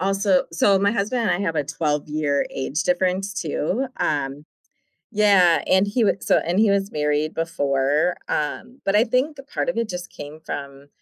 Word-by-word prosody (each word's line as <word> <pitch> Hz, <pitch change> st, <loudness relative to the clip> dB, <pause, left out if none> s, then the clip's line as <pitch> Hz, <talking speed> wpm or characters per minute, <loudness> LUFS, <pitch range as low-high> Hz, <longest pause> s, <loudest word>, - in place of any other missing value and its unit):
also 195 Hz, 0 st, +2 dB
So 195 Hz, +3 st, +3 dB
my 200 Hz, +1 st, +2 dB
husband 230 Hz, +3 st, -1 dB
and -, -, +1 dB
I -, -, +1 dB
have 165 Hz, -5 st, -1 dB
a 150 Hz, -, +1 dB
twelve-year 150 Hz, -1 st, -1 dB
age 135 Hz, +4 st, -2 dB
difference 195 Hz, -6 st, 0 dB
too, 245 Hz, +3 st, -2 dB
um 145 Hz, 0 st, -2 dB, 0.7 s
Yeah, 200 Hz, -5 st, +4 dB
and 190 Hz, +2 st, +3 dB
he 220 Hz, +3 st, +1 dB
would 190 Hz, -1 st, +1 dB
So -, -, +3 dB
And 175 Hz, +3 st, 0 dB
he 215 Hz, -1 st, +4 dB
was 200 Hz, 0 st, +1 dB
married 150 Hz, +1 st, 0 dB
before, 145 Hz, 0 st, 0 dB
um, 240 Hz, -, -3 dB
but 195 Hz, -, 0 dB
I 220 Hz, -, +5 dB
think 260 Hz, +5 st, 0 dB
a 275 Hz, -, -8 dB
part 270 Hz, -1 st, -4 dB
of 255 Hz, -, -1 dB
it 230 Hz, -, -1 dB
just 180 Hz, -1 st, -6 dB
came 150 Hz, +2 st, -10 dB
from, 140 Hz, -1 st, -7 dB
180 Hz, 185 wpm, -22 LUFS, 150-205 Hz, 0.7 s, I